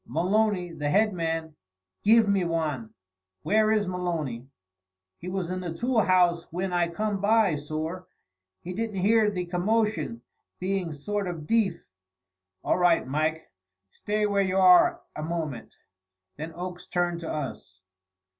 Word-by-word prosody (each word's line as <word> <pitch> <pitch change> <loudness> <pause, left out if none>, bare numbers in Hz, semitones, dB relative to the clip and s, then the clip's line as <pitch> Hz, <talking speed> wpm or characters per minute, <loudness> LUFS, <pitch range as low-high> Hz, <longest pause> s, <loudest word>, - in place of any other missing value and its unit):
Maloney, 185 +1 +1
the 150 -3 -3
head 210 +5 +3
man, 165 -2 -3 0.5
giv 225 +1 +5
me 200 -2 +2
wan." 155 -9 -2 0.5
"Where 215 0 +3
is 210 -2 +2
Maloney?" 165 -9 -3 0.7
"He 180 - -6
was 180 -2 -3
in 185 - -2
the 175 -3 -5
tool 240 +5 +1
house 180 -4 +3
whin 180 +2 -4
I 175 -1 +2
come 200 +3 -2
by, 210 -4 +3
sorr. 155 +5 -5 0.6
He 180 - -5
didn't 215 -1 -3
hear 215 +2 +4
the 180 -3 -3
commotion, 215 +6 -1 0.4
being 185 -2 -1
sort 200 +7 -3
o' 175 - -2
deef." 190 +3 0 0.8
"All - - +1
right, 175 -4 +3
Mike! 155 +3 -1 0.4
Stay 210 0 -1
where 200 -1 +2
you 190 -1 0
are 180 -2 +6
a - - -5
moment." 155 -6 -4 0.6
Then 155 +3 -6
Oakes 180 0 -7
turned 175 -1 -1
to 165 - -6
us. 110 -10 -6
180 Hz, 145 wpm, -27 LUFS, 165-205 Hz, 0.8 s, are